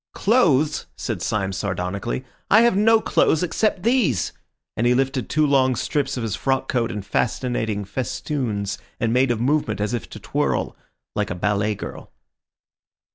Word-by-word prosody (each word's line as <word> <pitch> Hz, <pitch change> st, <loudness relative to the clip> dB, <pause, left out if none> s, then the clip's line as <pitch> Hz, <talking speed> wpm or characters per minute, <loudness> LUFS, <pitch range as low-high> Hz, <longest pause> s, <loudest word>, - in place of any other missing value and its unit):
"Clothes!" 155 Hz, -, +2 dB
said -, -, -4 dB
Syme 95 Hz, -3 st, -1 dB
sardonically. 90 Hz, -8 st, -3 dB, 0.2 s
"I 220 Hz, -, +7 dB
have 235 Hz, -3 st, +4 dB
no 225 Hz, +3 st, +5 dB
clothes 160 Hz, -5 st, +2 dB
except 190 Hz, +2 st, 0 dB
these," 205 Hz, -, +2 dB, 0.4 s
and 120 Hz, -, +1 dB
he 125 Hz, -, +4 dB
lifted 135 Hz, -2 st, 0 dB
two 155 Hz, 0 st, +2 dB
long 130 Hz, -3 st, +3 dB
strips 140 Hz, +3 st, -1 dB
of 120 Hz, -, -2 dB
his 110 Hz, -3 st, -2 dB
frock 135 Hz, -1 st, 0 dB
coat 120 Hz, -3 st, 0 dB
in 105 Hz, -, -5 dB
fascinating 110 Hz, -1 st, -1 dB
festoons, 110 Hz, -3 st, -3 dB, 0.2 s
and 115 Hz, -1 st, +1 dB
made 130 Hz, +1 st, +3 dB
a 120 Hz, -, +2 dB
movement 130 Hz, -1 st, 0 dB
as 105 Hz, +3 st, -1 dB
if 120 Hz, -, -3 dB
to -, -, -9 dB
twirl -, -, -1 dB, 0.4 s
like 105 Hz, -2 st, -1 dB
a 90 Hz, -, -3 dB
ballet 105 Hz, +3 st, 0 dB
girl. -, -, -8 dB
125 Hz, 160 wpm, -22 LUFS, 105-150 Hz, 0.4 s, I